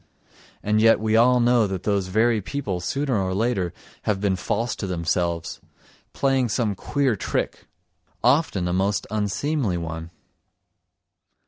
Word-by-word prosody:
And 105 +1 +2
yet 115 0 +5
we 110 0 +1
all 125 +2 +5
know 120 -2 +4
that 95 -2 -4
those 100 -3 0
very 110 +3 +2
people 105 -5 -3
sooner 135 - -1
or 95 0 -1
later 100 -5 0 0.3
have 105 -3 +1
been 100 -1 +1
false 115 +5 -2
to 100 - -4
themselves, 85 -1 -2 0.5
playing 135 -3 +1
some 110 -1 0
queer 135 +4 0
trick, - - -3 0.6
often 125 - +2
a 90 - -1
most 95 +2 0
unseemly 110 - -1
one. 80 -1 -5
105 Hz, 135 wpm, -24 LUFS, 95-120 Hz, 0.6 s, yet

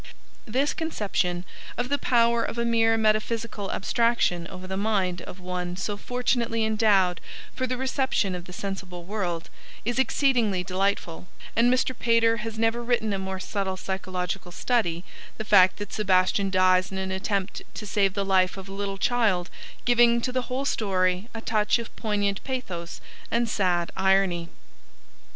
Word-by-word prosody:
This 265 +6 +1
conception, 195 - -1 0.3
of 245 +1 -1
the 285 0 +1
power 235 -1 +3
of 230 - -4
a 235 - 0
mere 225 -1 +3
metaphysical 215 -1 0
abstraction 210 -6 +1
over 185 +1 -9
the 190 +1 -4
mind 190 -4 0
of 180 - -10
one 180 -1 -4
so 205 +2 -2
fortunately 240 0 0
endowed 205 -5 +3 0.3
for 255 - -1
the 255 0 -2
reception 260 -6 0
of 180 -1 -6
the 180 - -11
sensible 185 -2 -6
world, 175 -4 -3 0.4
is 240 +2 0
exceedingly 240 -9 +2
delightful, 185 -2 -1 0.3
and 235 +2 +4
Mr. 255 0 +1
Pater 230 -1 +3
has 225 0 -5
never 225 +1 +1
written 230 -3 0
a 195 - -1
more 190 0 -4
subtle 190 0 -2
psychological 185 -1 -4
study, 175 -5 0 0.3
the 220 - -5
fact 185 -2 +6
that 205 -1 -6
Sebastian 195 -1 +2
dies 185 0 +3
in 190 - -4
an 190 0 -3
attempt 190 0 -2
to 210 - -6
save 195 -1 +1
the 200 -1 0
life 190 -1 +2
of 190 0 -8
a 195 - -8
little 195 0 -3
child 200 -5 +1 0.3
giving 240 -1 +5
to 255 - -2
the 255 -1 -2
whole 260 +2 -2
story 185 -3 0
a 225 - -4
touch 215 -1 +2
of 235 -1 -8
poignant 205 -3 -1
pathos 185 -11 -5 0.3
and 235 0 +1
sad 180 -5 +1
irony. 190 -3 +2
200 Hz, 160 wpm, -26 LUFS, 185-230 Hz, 0.4 s, fact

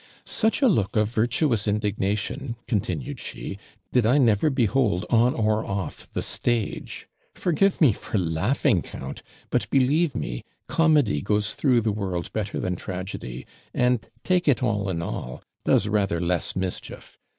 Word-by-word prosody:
'Such 225 +6 +1
a - - +7
look 110 - +1
of 105 -1 +3
virtuous 120 -1 +1
indignation,' 105 +4 -1
continued 90 - -2
she, 100 - -6 0.3
'did 125 - +4
I 120 +6 +4
never 120 0 +4
behold, 120 -7 +1
on 120 +1 +4
or 110 -1 +1
off 100 -4 -5
the - - -1
stage. 120 -4 -2 0.3
Forgive 185 +3 +2
me 140 -9 +6
for 105 - -4
laughing, 95 - +1
count; - - -8 0.3
but, - - 0
believe 140 +4 +3
me, - - -4 0.2
comedy 150 - +3
goes 105 +1 0
through 125 -5 +3
the 110 -1 0
world 95 -4 -3
better 105 -2 -2
than 90 -1 -1
tragedy, 90 -10 -6 0.3
and, 125 -2 +2 0.2
take 180 -2 +2
it 130 -4 +3
all 105 -5 0
in 85 -2 -2
all, 65 -6 -5 0.2
does - - +3
rather 100 -5 +1
less 90 0 0
mischief. 95 -1 -5
110 Hz, 150 wpm, -25 LUFS, 95-130 Hz, 0.3 s, a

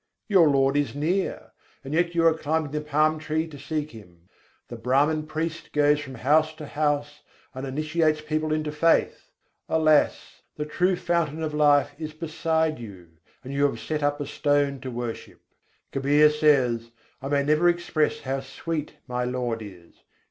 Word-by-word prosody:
Your 185 -8 +5
Lord 135 0 +2
is 140 -4 -1
near: 170 +7 -2 0.3
yet 170 +5 0
you 165 -1 +3
are 165 - +6
climbing 155 -1 -2
the 150 0 -2
palm 155 +1 +1
tree 155 +1 -1
to 150 -3 -11
seek 150 +1 -3
Him. 90 -5 -15 0.4
The - - -8
Brâhman 150 +4 +1
priest 160 +1 -4
goes 150 0 +3
from 130 -3 -8
house 155 +6 +2
to 155 -1 -8
house 145 0 -1 0.3
and 130 +1 -6
initiates 155 +3 0
people 155 0 -2
into 155 -1 -1
faith: 165 +2 +1 0.4
Alas! 155 -2 +2
the 150 - -3
true 180 +4 +1
fountain 165 -3 -1
of 155 -1 -3
life 145 -1 +4
is 155 -1 -5
beside 160 -1 -1
you., 95 -7 -11 0.3
and 135 +1 -7
you 140 +1 +1
have 115 -5 -5
set 150 +7 -3
up 145 0 0
a 145 - -3
stone 145 -1 0
to 130 - -5
worship. 120 -2 -6 0.5
Kabîr 145 +2 +4
says: 130 -7 +2 0.3
"I 135 - -5
may 140 0 +1
never 155 +4 +3
express 170 -3 0
how 135 +1 -2
sweet 150 +3 -5
my 125 -1 -2
Lord 125 -2 -2
is. 90 -5 -12
150 Hz, 165 wpm, -25 LUFS, 135-155 Hz, 0.5 s, are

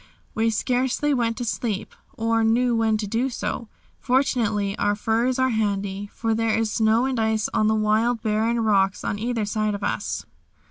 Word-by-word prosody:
We 225 +1 +1
scarcely 255 +5 0
want 230 -3 0
to 245 - -3
sleep, 220 -3 -3 0.2
or 225 0 +1
know 240 +2 +2
when 225 -1 +2
to 210 - -3
do 230 +6 0
so. 240 -2 -4 0.3
Fortunately 225 -6 +1
our 205 - +2
furs 230 +4 0
are 260 0 +2
handy, 200 -2 -2
for 225 -1 -1
there 225 0 +1
is 225 -1 0
snow 225 +2 +3
and 260 -3 -1
ice 220 -1 +1
on 215 - +2
the 220 - +3
wild, 220 +2 +1
barren 220 +2 +1
rocks 195 -3 +2
on 205 - -2
either 230 -1 -1
side 215 0 -1
of 200 - -7
us. - - -2
225 Hz, 180 wpm, -24 LUFS, 215-235 Hz, 0.3 s, snow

